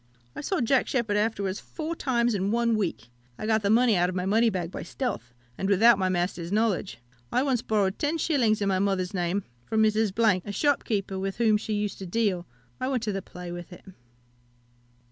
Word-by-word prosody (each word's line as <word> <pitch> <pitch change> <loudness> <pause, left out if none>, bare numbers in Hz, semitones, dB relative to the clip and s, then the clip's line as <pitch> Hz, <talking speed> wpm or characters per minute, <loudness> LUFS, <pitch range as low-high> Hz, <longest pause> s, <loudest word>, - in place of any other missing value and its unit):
I - - -5
saw 355 +2 -1
Jack 250 +2 +2
Sheppard 230 -5 0
afterwards 205 -2 0
four 325 +1 -5
times 240 -5 +1
in 195 -1 0
one 230 +1 +2
week. 175 - -2 0.3
I - - -5
got 220 0 +2
the 200 - 0
money 230 0 +4
out 180 0 +2
of 185 - -5
my 180 0 -1
money 225 +4 +3
bag 180 -4 -3
by - - -6
stealth, 175 - -4 0.3
and 195 - -1
without 210 +2 +6
my 185 -1 +1
master's 175 -1 -2
knowledge. 210 -3 0 0.3
I 250 - +2
once 260 -4 +1
borrowed 205 -4 0
10s. 290 -8 +1
in - - 0
my 190 -1 +1
mother's 195 -1 0
name 180 +2 -1 0.2
from 220 0 +2
Mrs., 215 -2 +2
a 205 - -5
shopkeeper, 205 -7 0
with 195 0 -3
whom 225 -2 +4
she 215 +1 -2
used 210 -1 -2
to 190 - -6
deal; 185 -3 0 0.3
I 255 - -1
went 260 -4 -1
to 215 - -1
the 195 -1 -3
play 180 -1 -9
with 175 0 -8
it. 180 - -13
210 Hz, 200 wpm, -27 LUFS, 190-230 Hz, 0.3 s, without